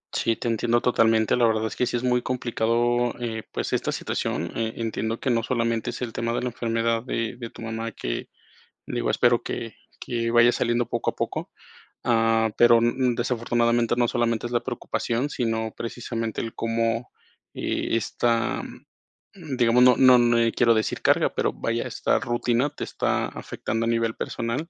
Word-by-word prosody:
Sí, 115 Hz, -1 st, +1 dB
te -, -, -5 dB
entiendo 120 Hz, +1 st, +1 dB
totalmente. 115 Hz, -3 st, +3 dB
La 120 Hz, -1 st, +4 dB
verdad 110 Hz, 0 st, +1 dB
es -, -, -4 dB
que 125 Hz, -, 0 dB
sí 120 Hz, -, -1 dB
es 120 Hz, -, -5 dB
muy 125 Hz, -1 st, +2 dB
complicado, 120 Hz, 0 st, 0 dB
eh, 115 Hz, -2 st, -4 dB
pues, -, -, -3 dB
esta -, -, 0 dB
situación. 85 Hz, -, -3 dB
Eh, 110 Hz, 0 st, -2 dB
entiendo 115 Hz, 0 st, -2 dB
que 130 Hz, -, 0 dB
no 115 Hz, -1 st, +2 dB
solamente 115 Hz, -2 st, -1 dB
es -, -, -6 dB
el 115 Hz, -, -5 dB
tema 115 Hz, 0 st, -2 dB
de -, -, -1 dB
la 125 Hz, -, -2 dB
enfermedad 115 Hz, -1 st, -1 dB
de 115 Hz, -1 st, -3 dB
de 120 Hz, -2 st, -7 dB
tu -, -, -11 dB
mamá 115 Hz, 0 st, -4 dB
que, -, -, -4 dB, 0.6 s
digo, -, -, -1 dB
espero -, -, +3 dB
que -, -, -5 dB, 0.3 s
que 115 Hz, -1 st, -2 dB
vaya 120 Hz, 0 st, +6 dB
saliendo 120 Hz, 0 st, 0 dB
poco 120 Hz, -, -1 dB
a -, -, -20 dB
poco. -, -, -3 dB, 0.5 s
Ah, 115 Hz, -2 st, +2 dB
pero 120 Hz, -1 st, +7 dB
n 120 Hz, +1 st, +2 dB
n 125 Hz, -2 st, +1 dB
desafortunadamente 120 Hz, -1 st, +1 dB
no 120 Hz, -1 st, +3 dB
solamente 120 Hz, -1 st, 0 dB
es 120 Hz, -, -4 dB
la 120 Hz, -, +2 dB
preocupación, 120 Hz, +1 st, -2 dB
sino 110 Hz, -2 st, -2 dB
precisamente 115 Hz, -1 st, -4 dB
el 115 Hz, -, -5 dB
cómo, 115 Hz, +1 st, -1 dB, 0.5 s
eh, -, -, -1 dB
esta, 115 Hz, +1 st, 0 dB
mm, 160 Hz, -9 st, -11 dB
digamos, 120 Hz, 0 st, +4 dB
no 125 Hz, -1 st, +7 dB
no 130 Hz, -1 st, +7 dB
n 120 Hz, -1 st, +3 dB
eh, 115 Hz, -, +1 dB
quiero 115 Hz, -1 st, +3 dB
decir 110 Hz, -1 st, -1 dB
carga. -, -, +3 dB
Pero, -, -, 0 dB
vaya, 115 Hz, +1 st, -2 dB
esta -, -, 0 dB
rutina 120 Hz, +3 st, 0 dB
te 150 Hz, -, -7 dB
está -, -, -1 dB
afectando 115 Hz, +1 st, -4 dB
a -, -, 0 dB
nivel 115 Hz, -1 st, +1 dB
personal 125 Hz, +8 st, -3 dB
115 Hz, 185 wpm, -25 LUFS, 115-120 Hz, 0.6 s, pero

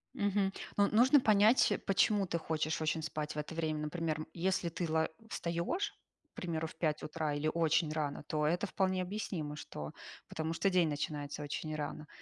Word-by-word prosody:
Мгм. 200 Hz, -1 st, +1 dB, 0.2 s
Ну, 200 Hz, 0 st, +5 dB
нужно 255 Hz, +7 st, +6 dB
понять, 215 Hz, +1 st, +5 dB
почему 200 Hz, +1 st, +3 dB
ты 170 Hz, -2 st, -1 dB
хочешь 160 Hz, -1 st, -1 dB
очень 160 Hz, 0 st, 0 dB
спать 155 Hz, -1 st, -3 dB
в -, -, -7 dB
это 150 Hz, +2 st, -4 dB
время. 160 Hz, -2 st, -1 dB
Например, 155 Hz, 0 st, -2 dB
если 180 Hz, 0 st, 0 dB
ты 170 Hz, 0 st, -3 dB
ла 160 Hz, 0 st, +2 dB, 0.2 s
встаёшь, 170 Hz, -, -1 dB, 0.4 s
к -, -, -57 dB
примеру, 160 Hz, -2 st, -2 dB
в 155 Hz, -3 st, 0 dB
утра, 150 Hz, -1 st, -2 dB
или 150 Hz, +2 st, 0 dB
очень 165 Hz, -1 st, +2 dB
рано, 150 Hz, -2 st, -2 dB
то 150 Hz, 0 st, -1 dB
это 175 Hz, +5 st, +1 dB
вполне 190 Hz, -1 st, +1 dB
объяснимо, 180 Hz, -6 st, -3 dB
что, 75 Hz, -, -7 dB, 0.4 s
потому 160 Hz, +1 st, -2 dB
что 195 Hz, +4 st, +2 dB
день 180 Hz, -3 st, +4 dB
начинается 145 Hz, 0 st, -3 dB
очень 155 Hz, +1 st, -3 dB
рано. 150 Hz, 0 st, -4 dB
160 Hz, 170 wpm, -34 LUFS, 155-185 Hz, 0.4 s, нужно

